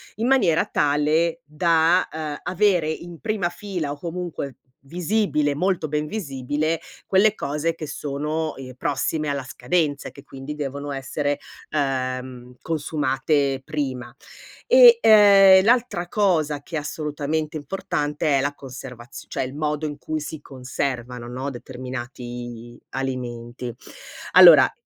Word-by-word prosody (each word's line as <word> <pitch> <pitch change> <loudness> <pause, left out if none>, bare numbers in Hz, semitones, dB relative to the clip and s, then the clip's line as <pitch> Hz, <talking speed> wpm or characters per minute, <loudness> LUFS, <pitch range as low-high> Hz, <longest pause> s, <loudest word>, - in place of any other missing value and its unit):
in 230 +3 -1
maniera 195 -12 +3
tale 150 +3 +1
da, 165 +3 +2
ehm, 155 -2 -4
avere 180 -3 +2
in 170 +1 -8
prima 210 -5 -1
fila 180 -6 -4
o 145 - -7
comunque 170 -6 -5 0.3
visibile, 175 -4 0
molto 170 -1 0
ben 150 0 -1
visibile, 150 -3 -2 0.3
quelle 200 +2 +4
cose 150 +1 -2
che 155 -2 -7
sono, 150 +3 -3
ehm, 130 -1 -9
prossime 150 +3 -1
alla 140 -2 -2
scadenza 150 0 -1
e - - -8
che 140 +1 -14
quindi 135 +3 -8
devono 140 0 -4
essere, 145 +1 -2 0.3
ehm, 130 -3 -3
consumate 145 -3 0
prima. 130 -5 -4 0.5
E, - - +8
ehm, 200 -3 +8
l'altra 235 -7 +2
cosa 160 -8 +1
che 165 - -8
è - - +1
assolutamente 150 +1 -3
importante 150 -2 -1
è - - +2
la 145 +1 -1
conservazi 125 -3 -10
cioè, - - -2
il 130 +2 -6
modo 150 0 -2
in 145 - -6
cui 155 +1 -4
si 155 0 -6
conservano, 125 -2 -4
no, 130 +3 -4
determinati 120 -2 -8
alimenti. 125 -2 -5 0.6
Allora - - +9
150 Hz, 130 wpm, -23 LUFS, 135-165 Hz, 0.6 s, Allora